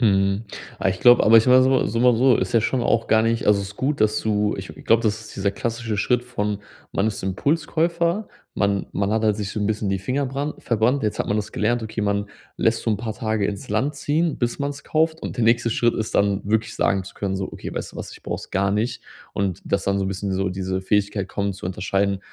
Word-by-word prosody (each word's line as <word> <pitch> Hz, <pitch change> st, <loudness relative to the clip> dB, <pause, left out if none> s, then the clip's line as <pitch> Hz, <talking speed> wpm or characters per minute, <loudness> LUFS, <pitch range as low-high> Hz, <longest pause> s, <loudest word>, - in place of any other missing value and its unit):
Mhm. 100 Hz, -1 st, +2 dB, 0.4 s
Ah, -, -, +2 dB
ich 95 Hz, 0 st, -1 dB
glaube, 120 Hz, 0 st, +7 dB
aber 115 Hz, +1 st, +7 dB
ich 115 Hz, -, +6 dB
war 130 Hz, +1 st, +7 dB
so 130 Hz, 0 st, +3 dB
so 115 Hz, +3 st, -1 dB
mal 125 Hz, -1 st, +5 dB
so, 125 Hz, 0 st, +5 dB
ist 95 Hz, -, -2 dB
ja 115 Hz, -, +4 dB
schon 125 Hz, +2 st, 0 dB
auch 115 Hz, 0 st, +1 dB
gar 110 Hz, 0 st, +4 dB
nicht 115 Hz, 0 st, 0 dB
also, 105 Hz, -1 st, +4 dB
es 100 Hz, -, -5 dB
ist 100 Hz, -, -13 dB
gut, 140 Hz, +2 st, -1 dB
dass 110 Hz, 0 st, +2 dB
du 105 Hz, -1 st, +1 dB
ich 95 Hz, -1 st, -7 dB, 0.2 s
glaube, 115 Hz, +1 st, +4 dB
das 110 Hz, 0 st, 0 dB
ist 110 Hz, -, -12 dB
dieser 100 Hz, 0 st, +1 dB
klassische 115 Hz, 0 st, -3 dB
Schritt 125 Hz, +4 st, +1 dB
von, 105 Hz, -4 st, -2 dB, 0.3 s
man 100 Hz, -, +1 dB
ist 105 Hz, -, -3 dB
Impulskäufer. 170 Hz, -, 0 dB, 0.3 s
Man 100 Hz, -1 st, 0 dB
man 100 Hz, 0 st, 0 dB
hat 110 Hz, 0 st, +1 dB
halt 105 Hz, -2 st, +2 dB
sich 105 Hz, -2 st, -4 dB
so 105 Hz, -, -4 dB
'n 105 Hz, -, 0 dB
bisschen 105 Hz, -1 st, -1 dB
die 95 Hz, -, 0 dB
Finger 135 Hz, +8 st, -1 dB
brand 140 Hz, +3 st, -4 dB
verbrannt. 120 Hz, +4 st, +1 dB
Jetzt 105 Hz, -1 st, -1 dB
hat -, -, -1 dB
man 105 Hz, -, 0 dB
das 105 Hz, -, -3 dB
gelernt, 120 Hz, +2 st, 0 dB
okay, 110 Hz, 0 st, -4 dB
man 100 Hz, 0 st, 0 dB, 0.3 s
lässt -, -, +1 dB
so -, -, 0 dB
'n 105 Hz, -, +1 dB
paar 110 Hz, -1 st, -3 dB
Tage 110 Hz, -2 st, -1 dB
ins 100 Hz, -1 st, -5 dB
Land 130 Hz, +8 st, 0 dB
ziehen, 155 Hz, +3 st, 0 dB
bis 120 Hz, +2 st, -1 dB
man's 140 Hz, 0 st, -3 dB
kauft. 160 Hz, +1 st, 0 dB
Und -, -, -5 dB
der 120 Hz, -, +1 dB
nächste 115 Hz, 0 st, +3 dB
Schritt 120 Hz, +1 st, +2 dB
ist 110 Hz, -, -3 dB
dann 100 Hz, -1 st, +2 dB
wirklich 110 Hz, +2 st, 0 dB
sagen 95 Hz, -1 st, +1 dB
zu 95 Hz, -, -11 dB
können 95 Hz, -1 st, -2 dB
so: 95 Hz, -, -4 dB
„Okay, -, -, -7 dB
weißt -, -, -5 dB
du -, -, -12 dB
was? -, -, -7 dB
Ich -, -, -14 dB
brauch -, -, -3 dB
es -, -, -11 dB
gar 100 Hz, +1 st, +1 dB
nicht.“ 110 Hz, +4 st, -1 dB, 0.3 s
Und 100 Hz, -2 st, -1 dB
dass 100 Hz, -1 st, -1 dB
dann 100 Hz, 0 st, +1 dB
so 95 Hz, -, 0 dB
'n 95 Hz, -, -1 dB
bisschen 95 Hz, 0 st, -3 dB
so 95 Hz, 0 st, 0 dB
diese 95 Hz, 0 st, -3 dB
Fähigkeit 100 Hz, 0 st, 0 dB
kommen 100 Hz, 0 st, -2 dB
zu 95 Hz, -, -10 dB
unterscheiden: 95 Hz, +2 st, 0 dB
110 Hz, 260 wpm, -23 LUFS, 100-120 Hz, 0.4 s, glaube